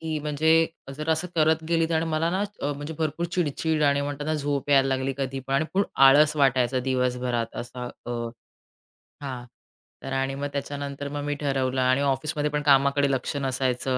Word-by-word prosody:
की 160 -1 -2
म्हणजे 160 +2 +3 0.3
जर 155 +1 -5
असं 160 +3 0
करत 160 0 +3
गेली 165 0 +1
आणि 160 +1 +1
मला 160 +1 0
ना 190 +3 0 0.2
अ, 145 +1 0
म्हणजे 145 +3 -6
भरपूर 160 +2 -1
चिडचिड 160 -2 0
आणि 140 -1 +3
म्हणताना 145 +2 -3
झोप 145 -1 -2
यायला 135 -1 +5
लागली 135 0 0
कधीपण 135 0 -3
आणि 160 +7 +1 0.2
आळस 150 +3 +5
वाटायचं 130 -2 +2
दिवसभरात 125 -2 -1
असा 125 +1 -6 0.2
अ, - - -4 1.1
हां 125 -3 -5 0.6
तर 135 - -5
आणि 135 0 -1
मग 145 +1 -3
त्याच्यानंतर 140 0 -4
मग 145 0 -4
मी 145 0 -1
ठरवलं 135 -3 -1
आणि 130 +2 +3
ऑफिसमध्ये 145 +2 0
पण 150 0 -1
कामाकडे 140 0 +4
लक्ष 130 +2 -2
नसायचं 130 -1 -1
140 Hz, 170 wpm, -25 LUFS, 135-155 Hz, 1.1 s, यायला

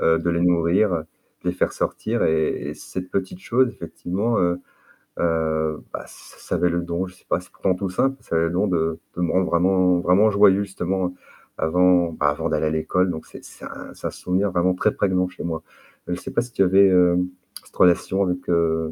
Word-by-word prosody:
heu, 80 0 +3
de 85 +1 -1
les 85 0 0
nourrir, 90 +4 +3
de 80 -2 -1 0.5
les - - -5
faire 90 - 0
sortir - - -2
et 80 -1 0
cette 90 0 -7
petite 95 -1 -3
chose 130 +1 +2
effectivement, 100 +5 -3
heu 85 0 +1 0.6
heu, 80 -2 0
bah, - - -5
ça - - -8
avait 90 - +2
le 85 0 0
don, 85 +1 -2
je 90 - -13
sais - - -25
pas, - - +2
c'est 90 - -16
pourtant 95 -2 0
tout 95 0 -3
simple, 135 +9 0
ça - - -4
avait 80 0 +3
le 85 - -1
don 95 +4 +1
de 80 -3 0 0.2
de 90 - -3
me 85 - +1
rendre 95 0 +2
vraiment 90 +1 +3
vraiment 95 +5 +4
joyeux 100 -1 +5
justement 95 -2 -2 0.5
avant, 90 +1 +3
bah, 75 -2 +1
avant 75 +3 -2
d'aller - - 0
à - - +2
l'école, 90 +4 +1
donc 80 - -7
c'est - - -12
c'est - - -12 0.4
un - - 0
souvenir 95 +3 -1
vraiment 90 +1 +2
très 105 +3 +1
prégnant 90 -2 +1
chez - - -9
moi. 80 -2 -3 0.5
Je 90 - -1
sais - - -8
pas - - +1
si 125 - -8
tu 100 - +2
avais 95 +1 +5 0.7
cette - - -22
relation 95 +2 +3
avec, 90 -1 -3
heu, 80 -2 +1
90 Hz, 205 wpm, -22 LUFS, 85-95 Hz, 0.7 s, joyeux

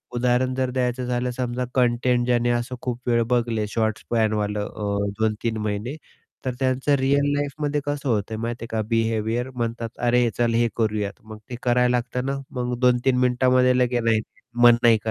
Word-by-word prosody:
उदाहरण 125 +1 +1
जर 130 -1 0
द्यायचं 125 0 -1
झालं, 125 0 -1
समजा 125 0 -2
कंटेंट 125 -1 +2
ज्याने 120 -1 +2
असं 120 +1 -2
खूप 120 -2 -3
वेळ 120 -1 +3
बघले, 115 -3 0
शॉर्ट्स 110 0 -1
स्पॅन 110 -2 0
वालं. 105 0 -1
अ, 100 -1 -2
2-3 110 +1 0
महिने, 105 +6 -3 0.5
तर 130 - -1
त्यांचं 130 +2 +1
रिअल 140 +2 +2
लाईफमध्ये 145 +1 -1
कसं 145 -2 -2
होतंय 110 0 -1
माहिती 115 +1 -4
आहे 115 - -5
का 110 -1 -2
बिहेवियर 115 +1 0
म्हणतात, 115 -1 -3
"अरे 120 0 +2
चल, 120 -1 +2
हे 120 0 +3
करूयात." 105 -3 -1
मग 110 0 -10
ते 125 - -5
करायला 125 0 +3
लागतं 125 +1 -3
ना 135 - -1 0.2
मग 125 0 -1
2-3 125 0 +3
मिनिटामध्ये 125 0 +3
लगेच, 125 -1 +1
नाही, 115 -1 +2 0.4
मन 120 -1 +8
नाही 115 -1 +6
120 Hz, 175 wpm, -23 LUFS, 115-125 Hz, 0.5 s, मन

